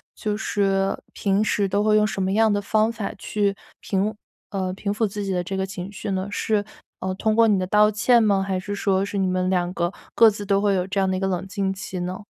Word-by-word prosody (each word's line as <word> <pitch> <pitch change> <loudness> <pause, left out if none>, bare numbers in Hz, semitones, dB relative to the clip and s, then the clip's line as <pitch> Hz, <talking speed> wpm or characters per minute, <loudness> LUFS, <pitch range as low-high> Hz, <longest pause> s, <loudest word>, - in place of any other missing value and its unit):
就 210 -1 -2
是 195 -2 0 0.2
平 200 +1 +1
时 205 -2 +1
都 200 +2 +1
会 215 0 +3
用 210 0 +4
什 195 -1 -3
么 190 - 0
样 220 +1 +4
的 205 - 0
方 215 +2 +2
法 215 -3 -4
去 200 -1 -1 0.3
平， 200 +2 -1 0.4
呃 190 -2 -2
平 200 +1 -3
抚 220 +1 +1
自 205 +1 -5
己 195 - -2
的 180 -1 0
这 190 +2 -4
个 190 - 0
情 190 0 -7
绪 205 0 -5
呢？ 190 +1 -2
是 210 0 0 0.6
通 220 -1 +1
过 230 0 +5
你 205 -3 +3
的 185 - -1
道 210 +2 +5
歉 230 +3 +4
吗？ 200 -2 +3
还 190 -1 -1
是 205 +2 -5
说 195 -1 +1
是 200 - -4
你 195 - +1
们 185 0 0
两 180 -1 0
个， 175 0 -1 0.2
各 230 - +8
自 205 -1 -6
都 200 0 +2
会 205 -1 +2
有 180 -1 0
这 195 +1 -1
样 190 - +2
的 185 - 0
一 - - -3
个 195 - -1
冷 190 0 -2
静 195 -1 -1
期 190 -1 -6
呢？ 180 +2 -4
200 Hz, 270 characters per minute, -23 LUFS, 190-210 Hz, 0.6 s, 各